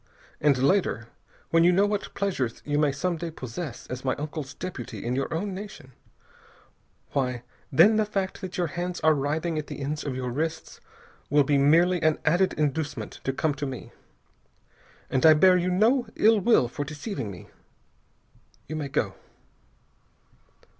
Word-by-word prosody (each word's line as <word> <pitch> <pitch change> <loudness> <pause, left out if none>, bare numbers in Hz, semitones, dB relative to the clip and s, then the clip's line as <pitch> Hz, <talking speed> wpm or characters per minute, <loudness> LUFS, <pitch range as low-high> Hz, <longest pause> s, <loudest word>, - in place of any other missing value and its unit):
And 145 -3 +3
later, 135 - +1 0.4
when 165 0 +5
you 175 - +6
know 195 +3 +4
what 205 -1 -3
pleasures 140 - -2
you 145 0 0
may 150 -2 +3
some 170 +5 -2
day 170 +1 -4
possess 130 -1 -7
as 125 0 -6
my 130 - 0
uncle's 145 -2 -6
deputy 165 -12 -6
in 120 +1 -1
your 135 +1 -2
own 190 +5 -2
nation, 195 -9 -9 1.2
why, 125 -3 -1 0.3
then 195 +10 +6
the 215 - +2
fact 195 -2 -3
that 185 -2 -6
your 175 - +1
hands 175 +2 -4
are 155 0 +5
writhing 155 +3 -1
at 150 - -6
the - - -7
ends 145 +2 -3
of 135 -3 -3
your 125 -1 -3
wrists 155 +5 -4 0.5
will 145 +1 +5
be 140 0 +2
merely 170 +5 +4
an 155 -1 +3
added 175 +4 +3
inducement 145 -5 -2
to 135 - +1
come 150 +3 0
to 145 0 -4
me. 130 -2 -7 1.2
And 130 - +1
I 160 -1 +8
bear 185 +4 +6
you 180 0 +1
no 225 +8 +3
ill 220 0 +5
will 210 - +4
for 145 +4 -4
deceiving 145 - -5
me. 90 -3 -10 1.2
You 155 - -4
may 145 -2 -3
go." 105 -7 -1
155 Hz, 165 wpm, -26 LUFS, 135-180 Hz, 1.2 s, I